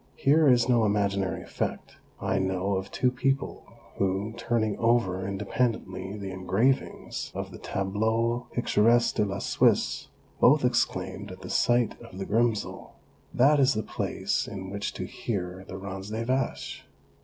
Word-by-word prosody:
Here 150 +2 +4
is 120 -1 +4
no 120 -3 +4
imaginary 100 -2 0
effect; - - -4 0.2
I - - 0
know 95 +1 0
of 95 +1 -3
two 125 +4 +1
people 135 +2 -1 0.3
who, 95 +3 0
turning 110 -3 0
over 115 -5 +2
independently 100 -1 -2
the 100 -2 -5
engravings 95 +8 -1
of - - -4
the - - -10
Tableaux 110 +5 0
piitoresque 120 0 +3
dc 105 - +2
la 100 0 -3
Suisse, - - +2 0.3
both 140 +1 +5
exclaimed 100 -5 -1
at 95 - -10
the - - -7
sight 120 -2 +2
of 115 -5 -11
Grimsel: 115 0 0 0.2
" - - -33
That 145 +3 +6
is 135 -2 +4
the 110 - -1
place - - -2
in 95 -1 -6
which 100 0 -3
to - - -4
hear 95 -3 -4
the 95 - -6
Rans 95 0 -6
des 110 +2 -3
vaches 130 +1 -2
105 Hz, 150 wpm, -27 LUFS, 95-120 Hz, 0.3 s, That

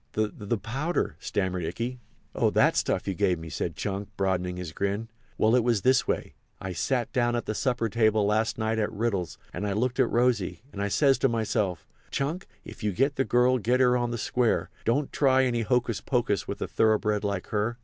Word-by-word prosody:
"The—the—powder?" 110 - -2
stammered 95 -2 -2
Ikey. 115 +10 -3 0.3
"Oh, - - +2
that - - +3
stuff - - 0
you 95 - 0
gave 90 0 +1
me!" 80 0 -8
said - - -3
Chunk, 100 0 -3
broadening 90 -2 0
his 90 -3 -5
grin; 100 +6 -2 0.3
"well, 110 +2 +4
it 125 - +3
was 115 -5 +1
this 130 0 +3
way. - - -2 0.3
I 95 -1 -5
sat 125 +5 -1
down 120 -1 +2
at 120 - -2
the - - -2
supper 120 0 0
table 110 -2 +2
last 110 +2 +1
night 110 0 0
at 105 - 0
Riddle's, 105 -5 -2 0.2
and 100 +4 -3
I 100 - -1
looked 125 +5 -1
at 130 - +4
Rosy, 115 -7 +1
and 100 - -5
I 100 - +1
says 135 +6 +3
to 135 - +3
myself, 105 -6 -1 0.2
'Chunk, 155 +7 -2 0.2
if - - -11
you 105 -2 0
get 135 +8 +1
the 135 - +2
girl 125 +1 +3
get 120 +4 +1
her 125 -1 +4
on 120 -1 0
the 120 - -3
square—don't 125 +3 0
try 130 -2 +4
any 120 -2 0
hocus 120 -1 0
pocus 120 -7 0
with - - -3
a - - -3
thoroughbred 105 -1 +2
like 100 -3 -2
her. 110 +2 -1
110 Hz, 200 wpm, -27 LUFS, 100-125 Hz, 0.3 s, well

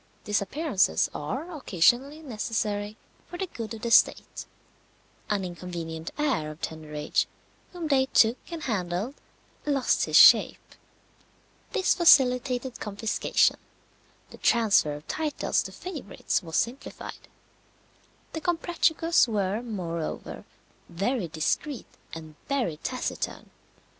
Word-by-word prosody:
Disappearances 205 - +1
are 285 - -5
occasionally 270 - +2
necessary 215 -4 -3 0.3
for 350 - -8
the 380 - -2
good 230 -9 -7
of 220 - -12
the 235 - -2
state. - - +3 0.8
An 200 -3 0
inconvenient 170 -2 -6
heir 275 - 0
of 155 +1 -10
tender 155 -1 -6
age 150 0 0 0.4
whom 345 -3 -5
they 265 -3 +3
took 230 -1 +4
and 330 -2 -5
handled 195 0 -2 0.5
lost 280 -3 +1
his - - -2
shape. - - +6 1.0
This 375 - +3
facilitated 255 -6 +4
confiscation; 210 +1 +1 0.7
the - - -13
tranfer 210 -10 +3
of 150 - -12
titles 310 -2 -1
to - - -7
favourites 305 - -3
was 160 -2 -7
simplified. 250 +5 -4 1.1
The 320 - -4
Comprachicos 335 -2 +2
were, 205 -1 -1
moreover, 175 -9 -5 0.4
very 195 +4 -1
discreet 170 - -2 0.3
and 160 -1 -9 0.2
very 250 - 0
taciturn. 255 +10 -4
225 Hz, 110 wpm, -27 LUFS, 175-280 Hz, 1.1 s, shape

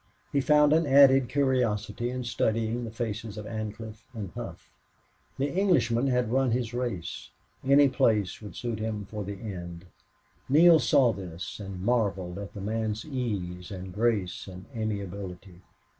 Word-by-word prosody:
He 140 - +2
found 150 +1 +5
an 160 -1 +3
added 135 -2 +6
curiosity 120 -5 0
in 125 0 -3
studying 115 +1 0
the - - -5
faces 115 -2 -4
of 105 - -6
Ancliffe 110 0 -6
and 100 -5 -5
Hough. - - -8 0.7
The 140 +1 -1
Englishman 135 - +2
had 125 -3 +1
run 135 0 +2
his 120 0 -1
race. 105 - -4 0.3
Any 140 +2 +6
place 115 -8 +1
would 105 - -9
suit 120 -3 -3
him 110 -2 -3
for 105 +1 -5
the 100 0 -6
end. 90 -4 -7 0.6
Neale 160 +3 +7
saw 125 -1 +4
this 90 -1 -7
and 95 -2 -6
marveled 100 -6 0
at 100 +1 -8
the 100 - -6
man's 110 +1 -2
ease 100 - -4
and 95 -1 -7
grace 105 -4 0
and 95 0 -9
amiability. 100 -4 -5
110 Hz, 150 wpm, -28 LUFS, 100-125 Hz, 0.7 s, Neale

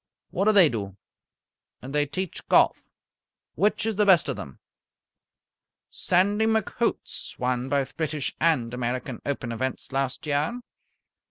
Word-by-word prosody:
What 195 - 0
do 215 - +6
they 195 -5 +7
do?" 100 -7 -4 0.8
"They 145 +3 -1
teach 185 +4 -5
golf." - - +3 0.6
"Which 205 +6 +1
is 220 -3 -1
the 210 - +4
best 180 -7 +6
of 135 - -1
them?" 70 - -9 1.3
"Sandy 205 +5 +2
McHoots 220 +1 -1
won 125 +1 -1
both 140 -1 -1
British 155 -3 -2
and 140 -8 +2
American 125 0 -3
Open 130 -4 -2
events 130 +3 -4
last 135 +1 -2
year." 150 +11 0
145 Hz, 125 wpm, -26 LUFS, 125-190 Hz, 1.3 s, they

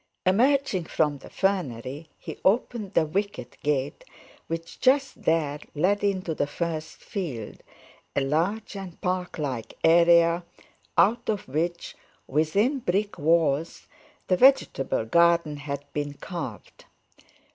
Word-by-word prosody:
Emerging 235 0 +3
from 150 -3 0
the - - -12
fernery, 150 -6 -2
he - - -8
opened 210 -1 +1
the 160 - +4
wicket 195 -6 -3
gate, 145 - -1 0.4
which 165 0 -6
just 270 +1 +2
there 150 -3 +1 0.2
led 195 +7 +1
into 190 -4 0
the 145 - -1
first 160 +1 -4
field, 140 - -6 0.5
a - - +2
large 170 +11 -1
and 190 -3 -8
park 180 0 -2
like 130 -7 -4
area, 170 +1 +5 0.5
out 235 +3 +3
of 210 -3 -1
which, 170 +5 -2 0.3
within 195 - +1
brick 205 -1 -1
walls, 160 0 +1 0.4
the 185 - +3
vegetable 245 - +3
garden 170 +2 +3
had 140 0 -5
been 145 -1 -3
carved. 150 - -7
170 Hz, 120 wpm, -26 LUFS, 150-195 Hz, 0.5 s, area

